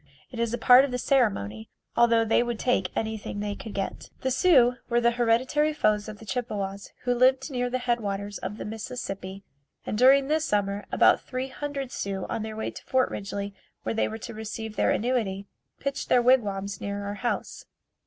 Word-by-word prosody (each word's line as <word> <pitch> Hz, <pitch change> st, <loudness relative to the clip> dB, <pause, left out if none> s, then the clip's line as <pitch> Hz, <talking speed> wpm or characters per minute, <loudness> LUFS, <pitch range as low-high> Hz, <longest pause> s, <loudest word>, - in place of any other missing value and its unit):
It 240 Hz, -, -7 dB
is 235 Hz, -1 st, 0 dB
a 240 Hz, -, -1 dB
part 250 Hz, +1 st, +7 dB
of 280 Hz, -, -1 dB
the 250 Hz, -, -2 dB
ceremony, 195 Hz, -, 0 dB, 0.3 s
although 230 Hz, -1 st, +4 dB
they 225 Hz, -, +3 dB
would 240 Hz, -1 st, -2 dB
take 215 Hz, -6 st, +1 dB
anything 220 Hz, -2 st, -3 dB
they 205 Hz, 0 st, -2 dB
could 210 Hz, +1 st, -8 dB
get. 195 Hz, -1 st, -4 dB
The 260 Hz, -, 0 dB
Sioux 255 Hz, -5 st, +5 dB
were 240 Hz, 0 st, +3 dB
the 235 Hz, 0 st, +3 dB
hereditary 245 Hz, +6 st, +2 dB
foes 215 Hz, -7 st, +1 dB
of 215 Hz, -, -8 dB
the 220 Hz, -, -13 dB
Chippewas 200 Hz, -3 st, -4 dB
who 245 Hz, -, +2 dB
lived 260 Hz, +4 st, +3 dB
near 245 Hz, -1 st, -1 dB
the 255 Hz, -, 0 dB
head 245 Hz, -1 st, 0 dB
waters 200 Hz, -1 st, -4 dB
of 210 Hz, -, -5 dB
the -, -, -6 dB
Mississippi 200 Hz, -3 st, -6 dB, 0.4 s
and -, -, -2 dB
during 270 Hz, +2 st, +6 dB
this 310 Hz, +1 st, +1 dB
summer 205 Hz, -5 st, -1 dB
about -, -, +5 dB
three 255 Hz, +1 st, -4 dB
hundred 280 Hz, -2 st, -5 dB
Sioux 195 Hz, -5 st, -3 dB
on -, -, -2 dB
their 220 Hz, 0 st, -5 dB
way 220 Hz, -, -3 dB
to -, -, -11 dB
Fort 260 Hz, -1 st, +1 dB
Ridgely 200 Hz, 0 st, -4 dB, 0.3 s
where -, -, -1 dB
they 225 Hz, -, +1 dB
were 220 Hz, -, -5 dB
to 230 Hz, +1 st, -8 dB
receive 220 Hz, 0 st, -6 dB
their -, -, +2 dB
annuity, 215 Hz, -5 st, 0 dB, 0.3 s
pitched 275 Hz, 0 st, -3 dB
their 250 Hz, -, +5 dB
wigwams 200 Hz, -6 st, +2 dB
near 200 Hz, 0 st, -3 dB
our 200 Hz, -, -3 dB
house. 240 Hz, -, -3 dB
225 Hz, 200 wpm, -27 LUFS, 205-250 Hz, 0.4 s, part